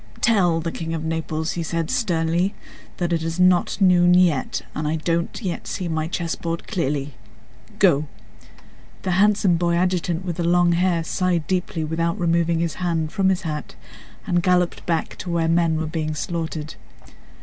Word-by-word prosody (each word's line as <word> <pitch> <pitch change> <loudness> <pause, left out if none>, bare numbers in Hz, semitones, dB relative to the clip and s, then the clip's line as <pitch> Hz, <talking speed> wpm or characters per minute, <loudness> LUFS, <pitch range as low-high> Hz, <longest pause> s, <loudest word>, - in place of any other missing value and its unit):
"Tell 185 -8 +3
the 165 +1 -3
King 165 0 -4
of 160 - -4
Naples," 160 0 -2
said 165 -2 -2
he - - -1
sternly, 175 -5 0 0.4
"that 175 -1 -1
it 165 - 0
is 165 +2 -3
not 180 +1 +3
noon 180 -2 +5
yet, 175 -7 +2
and 150 0 -3
I 155 - 0
don't 165 +1 -1
yet 180 -3 -4
see 180 - -3
my 160 -1 -1
chessboard 170 0 -3
clearly. 145 -7 -2 0.6
Go!..." 155 -7 +3 1.0
The 185 - -1
handsome 195 -1 +3
boy 170 0 +1
adjutant 180 0 0
with 175 -3 -3
the 175 - -1
long 175 0 +3
hair 170 -1 +1
sighed 175 -1 0
deeply 180 -2 -1
without 165 +4 -1
removing 170 -1 +1
his 165 -2 -1
hand 165 -3 -1
from 195 -2 +2
his 185 -2 0
hat 150 -3 -5 0.5
and 175 0 +1
galloped 180 -1 +1
back 165 -2 -1
to 185 - -6
where 170 -1 +1
men 165 -1 +2
were 160 - -1
being 155 -1 -3
slaughtered. 160 -1 -4
170 Hz, 170 wpm, -22 LUFS, 160-180 Hz, 1.0 s, noon